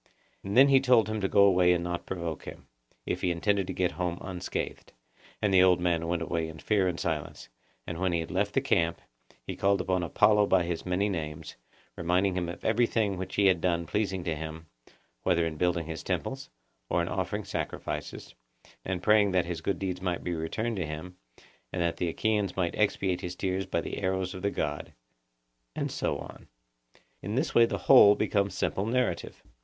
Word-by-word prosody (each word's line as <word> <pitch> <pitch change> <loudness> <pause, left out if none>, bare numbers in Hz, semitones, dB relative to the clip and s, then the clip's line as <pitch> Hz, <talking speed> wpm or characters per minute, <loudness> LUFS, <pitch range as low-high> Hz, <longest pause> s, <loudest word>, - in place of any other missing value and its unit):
And 100 +4 -2
then 135 +2 +8
he 135 -1 +6
told 125 -4 +4
him 110 -1 -3
to 95 - +1
go 100 +1 +5
away 90 -2 +5
and 85 -1 -1
not 85 0 -2
to - - -6
provoke 85 -4 -5
him, - - -10 0.4
if - - -2
he 90 - +1
intended 95 +3 0
to - - -3
get 90 -1 0
home 90 +2 -3
unscathed. 90 -2 -5 0.5
And 100 -2 +2
the 95 - +7
old 90 -1 +5
man 85 -2 0
went 85 0 -1
away 80 -1 -2
in 80 0 -9
fear 100 +1 +1
and 85 -2 -2
silence, 75 -7 -4 0.4
and, 85 -1 -5
when 95 -1 +1
he 85 - +1
had 80 - -5
left - - -1
the - - +3
camp, 85 0 +1 0.5
he - - -5
called 100 0 +2
upon 95 -1 0
Apollo 105 +4 +3
by 95 -2 +3
his 85 +1 -4
many 90 +3 +1
names, 80 -4 -5 0.4
reminding 90 +3 +1
him 90 -2 -2
of 85 - -8
everything 110 -3 +2
which 95 0 -5
he 100 - +3
had 90 -3 +4
done 85 -1 0
pleasing 95 0 -1
to 85 -2 -1
him, 80 +1 -7 0.6
whether 85 -2 +2
in 80 -1 -3
building 85 -1 0
his 80 0 -6
temples, - - -3 0.4
or - - +1
in - - -3
offering - - -2
sacrifice, - - -5 0.5
and 95 -2 -3
praying 105 -2 +4
that 90 -1 +2
his 85 -1 -4
good 95 +2 -1
deeds 90 -2 -3
might 90 -2 -2
be 90 - -2
returned 105 +8 -2
to 85 -4 -2
him, 80 +4 -7 0.6
and 90 - -4
that 85 -1 -1
the 90 - -1
Achaeans 105 +1 -1
might 90 -2 0
expiate 95 -3 0
his 90 0 -5
tears 95 0 -2
by 85 -3 -1
the - - -5
arrows 95 -1 -1
of 95 - -7
the 100 - +1
god,'—and - - -7
so - - -1
on. - - -11 0.7
In 105 +4 -4
this 135 +3 0
way 115 0 +6
the - - -2
whole 105 -6 +8
becomes 100 -2 0
simple 100 +2 -1
narrative. 125 +2 -1
90 Hz, 200 wpm, -28 LUFS, 85-100 Hz, 0.7 s, then